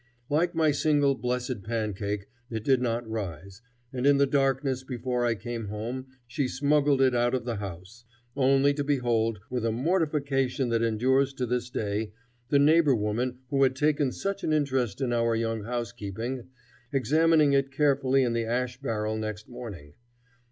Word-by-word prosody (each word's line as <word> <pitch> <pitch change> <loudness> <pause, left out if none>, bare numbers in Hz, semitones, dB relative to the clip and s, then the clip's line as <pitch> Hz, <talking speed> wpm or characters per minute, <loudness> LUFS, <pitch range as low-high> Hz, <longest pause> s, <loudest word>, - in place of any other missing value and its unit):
Like 170 +4 +1
my 160 -2 +3
single 145 -1 +2
blessed 125 -2 -3
pancake, 105 -2 -3 0.2
it 110 -2 -4
did 130 0 +3
not 120 -1 -1
rise, 100 -2 -6 0.3
and 130 +1 0
in 145 0 +6
the 140 - +4
darkness 135 -1 0
before 125 -1 -2
I 115 - +1
came 115 +1 -5
home 115 +6 -5 0.2
she 125 +3 -2
smuggled 140 +1 +2
it 130 -1 +3
out 120 +1 +2
of 125 -2 -3
the 120 -3 -2
house; 100 +3 -8 0.3
only 135 +1 +4
to 145 0 -2
behold, 120 -6 +1
with 125 -2 -2
a 115 - +1
mortification 140 -2 0
that 115 -1 +1
endures 130 +5 +2
to 130 -2 -2
this 120 0 -2
day, 105 -3 -3 0.4
the 145 - +4
neighbor 150 -1 +5
woman 120 +4 -2
who 140 -1 +2
had 130 -1 +4
taken 145 -1 +1
such 195 +6 -4
an - - 0
interest 135 -8 0
in 125 -2 0
our 115 -1 +2
young 115 -2 -2
housekeeping, 120 +1 -4 0.4
examining 150 +3 +3
it 135 0 +2
carefully 135 -2 +2
in 120 -2 0
the 115 -1 0
ash 125 +2 -2
barrel 110 -4 -2
next 110 -1 -5
morning. 105 -13 -9
125 Hz, 165 wpm, -27 LUFS, 115-140 Hz, 0.4 s, in